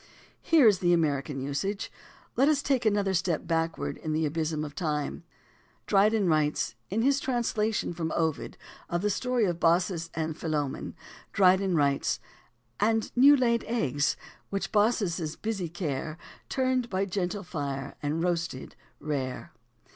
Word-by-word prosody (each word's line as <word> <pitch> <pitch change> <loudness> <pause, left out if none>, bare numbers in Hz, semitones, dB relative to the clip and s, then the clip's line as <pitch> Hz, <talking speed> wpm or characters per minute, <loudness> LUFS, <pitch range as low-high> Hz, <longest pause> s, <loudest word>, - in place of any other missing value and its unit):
Here 320 -6 +5
is 205 -3 +5
the 175 -1 +3
American 145 -4 0
usage. 145 +10 -3 0.4
Let 270 +3 +4
us 290 -2 +2
take 260 -5 +1
another 205 -2 +2
step 175 -3 0
backward 165 -1 -1
in 155 -1 -4
the 160 +1 +1
"abysm 155 0 -1
of 145 - -8
time." 150 -2 -2 0.7
In 195 -1 +2
his 280 +1 +3
translation 225 -7 -1
from 165 -2 -3
Ovid 160 -2 -1 0.3
of 175 +2 -1
the 210 - +2
story 250 +2 +1
of 175 -3 -1
Baucis 170 0 +2
and 160 -1 -2
Philemon 150 -4 -3 0.4
Dry 185 -2 +6
den 190 -2 0
writes: 140 -2 +1 0.6
"And 225 +1 +1
new 280 +4 +7
laid 235 -3 +2
eggs, 145 - 0 0.3
which 195 0 -3
Baucis' 200 -7 +1
busy 200 -6 -3
care 155 -2 -4 0.3
Turned 255 -2 0
by 190 0 -1
a - - +2
gentle 195 +1 -2
fire 140 -6 -4
and 150 +3 -1
roasted 170 -6 -2 0.2
rare." 135 -4 -4
175 Hz, 140 wpm, -28 LUFS, 155-215 Hz, 0.7 s, new